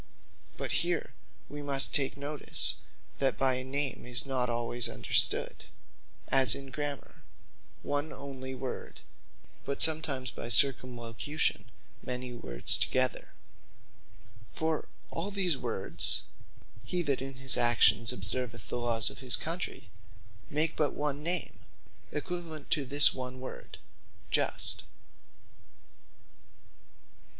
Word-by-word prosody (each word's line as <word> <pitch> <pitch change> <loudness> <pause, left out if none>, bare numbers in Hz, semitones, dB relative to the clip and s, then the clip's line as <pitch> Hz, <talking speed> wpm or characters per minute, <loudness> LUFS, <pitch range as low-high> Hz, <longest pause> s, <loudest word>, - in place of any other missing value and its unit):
But - - -3
here - - -2 0.3
wee 145 0 -8
must 140 -1 +2
take 140 -2 0
notice, 145 +1 +2 0.4
that 135 -1 +1
by 130 -1 +2
a 130 - -4
Name 140 0 -3
is 125 +2 +2
not 130 -2 -1
alwayes 120 0 -1
understood, - - +1 0.6
as 135 -1 +4
in 135 -1 -9
Grammar, 145 -1 -6 0.6
one 145 +2 -2
onely 130 -1 -8
word; 130 0 -7 0.6
but 140 - -4
sometimes 155 -5 +4
by 115 - -6
circumlocution 125 +2 +2 0.3
many 125 0 -5
words - - +3
together. 130 0 0 1.2
For 160 -1 -2 0.2
all 165 +5 -3
these 190 -5 +1
words, 115 -7 +2 0.6
Hee 175 +10 -1
That 140 -4 -1
In 135 0 -6
His 135 -2 +4
Actions 120 -1 +5
Observeth 115 0 -4
The 125 - -3
Lawes 115 -2 +2
Of - - -11
His 130 -2 +2
Country, 165 - -4 0.6
make 155 +2 0
but 150 - 0
one 145 -1 -3
Name, 170 +1 -2 0.5
equivalent 160 -1 -5
to 145 - +1
this 145 +2 +6
one 130 0 -6
word, 130 - -9 0.5
Just. - - +1
135 Hz, 115 wpm, -30 LUFS, 125-145 Hz, 1.2 s, this